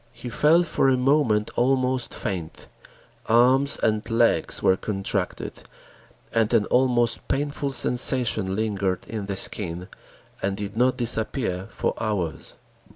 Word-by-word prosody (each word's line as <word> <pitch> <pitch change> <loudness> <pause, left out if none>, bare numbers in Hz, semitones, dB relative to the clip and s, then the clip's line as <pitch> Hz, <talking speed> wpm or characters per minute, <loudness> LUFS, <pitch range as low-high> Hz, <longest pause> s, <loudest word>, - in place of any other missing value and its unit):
He 120 +1 -8
felt 155 +8 +3
for 135 - +1
a 130 - +3
moment 125 -5 +2
almost 130 -1 +1
faint; 90 -7 -5 0.6
arms 130 +5 +4
and 110 -1 +2
legs 115 0 +2
were 95 - +4
contracted 95 0 -3 0.7
and 110 -1 +2
an 105 -2 +3
almost 125 -2 +2
painful 145 +1 -2
sensation 125 -6 +1
lingered 100 -3 -1
in 105 -3 -5
the 100 - -3
skin, 90 -2 -1 0.5
and 95 0 -2
did 105 0 -6
not 125 +2 +2
disappear 110 -5 -1
for - - -2
hours. 95 -7 -3
115 Hz, 125 wpm, -24 LUFS, 100-130 Hz, 0.7 s, arms